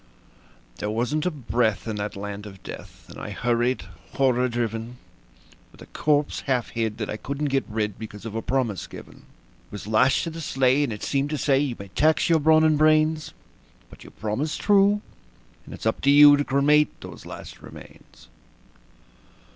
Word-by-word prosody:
There 105 - -3
wasn't 125 +9 -1
a - - +3
breath 120 - -1
in 110 -2 -3
that 105 0 -4
land 100 +1 -6
of 95 -2 -13
death, - - -10
and - - -11
I - - -6
hurried, 120 +1 0 0.3
horror 125 -2 +2
driven, 115 0 -3 0.7
With - - -20
a - - -12
corpse 150 -1 0
half 125 -3 0
hid 115 -2 -2
that 105 -2 -3
I 105 - -4
couldn't 140 +4 -3
get 135 - +1
rid, 105 -2 -3
because 105 -1 -9
of 115 - -6
a 115 - -2
promise 120 -8 -2
given; - - -12 0.5
It - - -30
was 105 - -7
lashed 110 +5 +3
to 165 - -4
the 165 +1 -7
sleigh, 135 -1 +2
and 135 - -2
it 105 - -6
seemed 140 +1 0
to 150 - -2
say: 135 -1 +2
"You 140 -4 -1
may 100 -1 -10
tax 155 - +2
your 165 - +5
brawn 155 +1 +4
and 155 -2 +3
brains, 155 0 +3 0.6
But - - -14
you - - -12
promised 120 +9 -3
true, 205 0 +3 0.6
and - - -10
it's - - -10
up 110 - 0
to 140 - +2
you 145 0 +9
to 145 - 0
cremate 145 +2 +2
those - - -10
last - - -10
remains." - - -15
130 Hz, 185 wpm, -24 LUFS, 110-150 Hz, 0.7 s, you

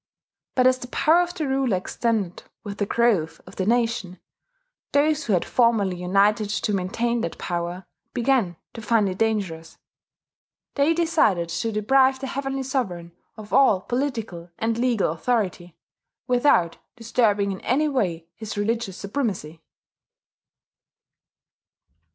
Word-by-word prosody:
But 255 - +3
as 255 0 +4
the 245 - -7
power 320 +6 +3
of 350 0 -3
the 315 -5 -2
ruler 265 -6 +1
extended 205 -1 -2 0.2
with 200 -1 -7
the 205 - 0
growth 210 -10 +1
of 185 - -14
the 190 - -1
nation, 230 -5 0 0.7
those 300 +1 +2
who 215 - +1
had 180 - +1
formerly 220 -7 +2
united 200 +4 +2
to 210 0 -1
maintain 230 +5 -1
that 170 - -4
power 175 +1 -4 0.3
began 235 -9 +1 0.2
to 230 - -8
find 215 -1 +2
it 185 0 -4
dangerous. 190 -8 -2 1.0
They 295 +3 +2
decided 300 - +2
to 170 +7 -2
deprive 260 +5 +3
the 270 - -5
Heavenly 270 0 -3
Sovereign 190 -11 -3 0.3
of 215 -1 -10
all 265 -8 +5
political 225 -9 -3
and 225 0 0
legal 235 -7 +1
authority, 180 -2 -2 0.5
without 245 - +2 0.2
disturbing 220 -4 +1
in 190 - -6
any 290 +5 +1
way 180 - -1
his 220 -2 -7
religious 215 -2 -1
supremacy. 200 - -3
220 Hz, 135 wpm, -24 LUFS, 185-255 Hz, 1.0 s, all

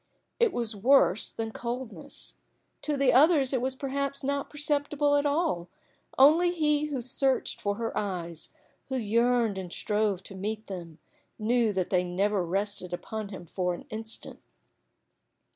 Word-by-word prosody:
It 470 -3 +4
was 235 -5 -1
worse 220 -2 +4
than 225 -1 -4
coldness. 240 +1 -5 0.5
To 295 -2 -1
the 275 -2 +3
others 285 -1 +5
it 255 - +1
was 260 +1 -1
perhaps 275 +1 -2
not 280 +1 -1
perceptible 290 -1 +1
at 290 0 +2
all; 285 - 0 0.5
only 315 +6 +6
he 300 -3 +1
who 285 -4 -3
searched 265 +2 0
for 205 0 0
her 230 +1 -3
eyes, 175 -5 -4 0.4
who 265 - -3
yearned 230 -2 +2
and 180 -2 -7
strove 210 -2 0
to 195 - -8
meet 215 +3 -4
them, 170 -5 -8 0.4
knew 230 0 +2
that 185 -2 -1
they 180 -2 +3
never 190 +2 0
rested 190 0 -2
upon 215 +3 -5
him 190 -3 -8
for 180 +1 -2
an - - -11
instant. 220 +1 -5
230 Hz, 150 wpm, -28 LUFS, 195-280 Hz, 0.5 s, only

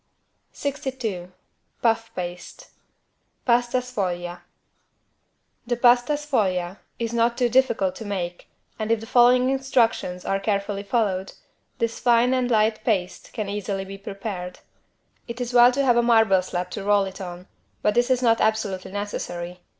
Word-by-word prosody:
62 255 -10 -4 0.5
PUFF 225 -1 +2
PASTE 175 0 -7 0.8
(Pasta 240 0 +2
sfoglia) 180 -8 -3 1.3
The 240 - +1
=Pasta 245 +3 +4
sfoglia= 205 -11 -1 0.2
is 230 0 -3
not 235 0 +2
too 245 -1 +2
difficult 230 -7 +2
to 225 - -8
make 180 -4 -4 0.3
and 215 +1 -2
if 230 - +3
the 225 - -8
following 250 +2 +4
instructions 245 -9 0
are 195 - 0
carefully 200 0 -1
followed, 200 -3 -1 0.4
this 230 -1 -2
fine 240 +1 +3
and 255 -1 +1
light 215 -1 +2
paste 190 -6 -1
can 215 -4 -3
easily 200 -1 -3
be 195 +1 -9
prepared. 195 -2 -6 0.7
It 235 0 -7
is 245 0 -3
well 245 0 +7
to 275 +2 0
have 245 -2 +4
a - - +5
marble 225 -5 +4
slab 180 0 -4
to 200 - -5
roll 205 0 +3
it 190 +1 -8
on 180 -1 -7 0.4
but 210 - +3
this 240 +2 +2
is 255 -1 +2
not 230 -1 +3
absolutely 210 -4 -1
necessary. 180 -3 -5
220 Hz, 150 wpm, -24 LUFS, 190-240 Hz, 1.3 s, well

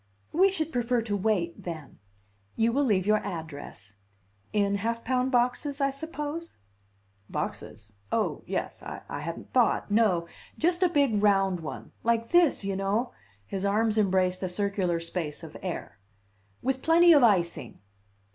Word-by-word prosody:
"We 380 +4 +5
should 320 -4 -2
prefer 240 -1 +1
to 210 -2 -2
wait, 195 -4 0
then. 160 -6 -7 0.6
You 230 +1 +2
will 285 +3 +2
leave 195 -6 +2
your 215 +1 +4
address. 145 - -7 0.5
In 200 -1 +1
half 230 +3 -2
pound 255 +1 0
boxes, 250 +4 +1
I 275 -1 +2
suppose?" 310 +3 -6 0.7
"Boxes? 105 0 -5 0.2
Oh, - - 0
yes - - -3
I - - -7
hadn't 165 +3 -7
thought 245 -4 +2
no 200 -6 +3 0.3
just 345 +2 +1
a 365 - +5
big, 280 -10 +2
round 195 -3 +3
one. 155 -2 -7
Like 230 0 +1
this, 345 -10 +4
you 195 -1 -1
know!" 205 +6 0 0.3
His 190 - -4
arms 215 +2 +2
embraced 185 -2 +2
a 185 - -1
circular 190 -2 0
space 165 -2 -4
of 160 -1 -10
air. 175 - -5 0.6
"With 265 0 0
plenty 340 +1 +6
of 290 - +6
icing." 185 -7 +2
210 Hz, 145 wpm, -28 LUFS, 180-260 Hz, 0.7 s, plenty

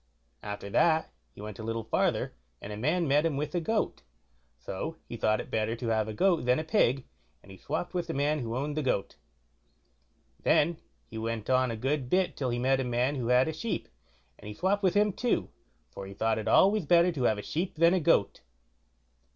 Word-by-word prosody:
After 105 -1 -6
that 160 +5 +3 0.2
he - - -11
went 105 0 -8
a - - -6
little 115 0 -3
farther, 110 - 0 0.3
and 105 - -7
a - - -5
man 155 +10 0
met 145 +2 +3
him 160 -4 0
with 150 +1 -3
a 175 - 0
goat; 215 +6 -1 0.6
so 95 - -5
he - - -6
thought 110 -1 +1
it - - -7
better 110 +1 0
to 120 0 -5
have 110 -1 +1
a 110 - -4
goat 175 - +2
than 125 +1 +3
a 155 - -2
pig, 140 - +2 0.4
and 95 - -14
he 95 - -11
swopped 160 +4 -4
with 175 -1 -2
the - - -4
man 145 +1 +1
that 115 - -4
owned 140 +5 -2
the 155 - 0
goat. 125 -8 -1 1.2
Then 165 +2 +3 0.3
he 110 - -8
went 115 0 -3
on 130 0 +3
a 115 - -3
good 135 +2 -1
bit 185 +3 +1
till 130 -3 -2
he 120 - -1
met 130 +2 +2
a - - 0
man 125 +2 0
who 125 -5 -3
had 125 +3 +4
a 160 - -2
sheep, 215 +8 -4 0.5
and - - -11
he 105 - -7
swopped 195 - +1
with 190 -1 +2
him 210 -1 +3
too, 245 +4 0 0.4
for 100 - -8
he 100 - -10
thought 110 +1 0
it 110 - -5
always 195 - +4
better 175 +2 +5
to 140 -7 -3
have 110 - +2
a 105 - -6
sheep 175 - -3
than 170 +2 +4
a 185 - +3
goat. 150 - +2
135 Hz, 225 wpm, -29 LUFS, 115-165 Hz, 1.2 s, better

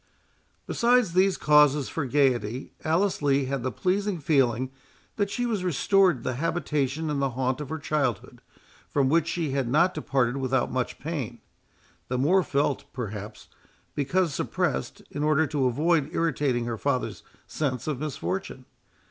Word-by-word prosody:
Besides 240 -6 +2
these 185 +1 +3
causes 150 -2 +4
for 160 - -3
gaiety, 125 -3 +1
Alice 175 +4 +1
Lee 140 -1 +2
had 135 0 -2
the 130 +1 -2
pleasing 195 - 0
feeling 130 -4 +1 0.5
that 205 -2 +1
she 245 +4 -2
was 215 -6 -1
restored 185 0 +3
to - - -13
the 130 - -2
habitation 150 -1 -1
and 140 -2 -1
the 135 - +1
haunts 130 +2 -1
of 150 - -6
her 160 - -3
childhood, 140 -8 -2 0.5
from 135 -2 +2
which 165 +1 +3
she 170 -4 -1
had 135 -2 0
not 170 +8 +3
departed 135 -4 0
without 130 -1 0
much 130 -1 -2
pain, 135 -7 -4 0.7
the 125 - -2
more 170 +9 +4
felt, 140 -4 -1
perhaps, 105 -4 -6 0.5
because 165 +3 0
suppressed, - - -2
in 145 - -4
order 155 +1 +3
to 145 -4 0
avoid 150 +3 +1
irritating 140 -7 0
her 115 -2 -4
father's 140 -3 -1 0.2
sense 130 -6 -2
of 150 -5 -2
his 150 -1 -3
misfortune. 180 -8 -4
145 Hz, 155 wpm, -26 LUFS, 130-165 Hz, 0.7 s, causes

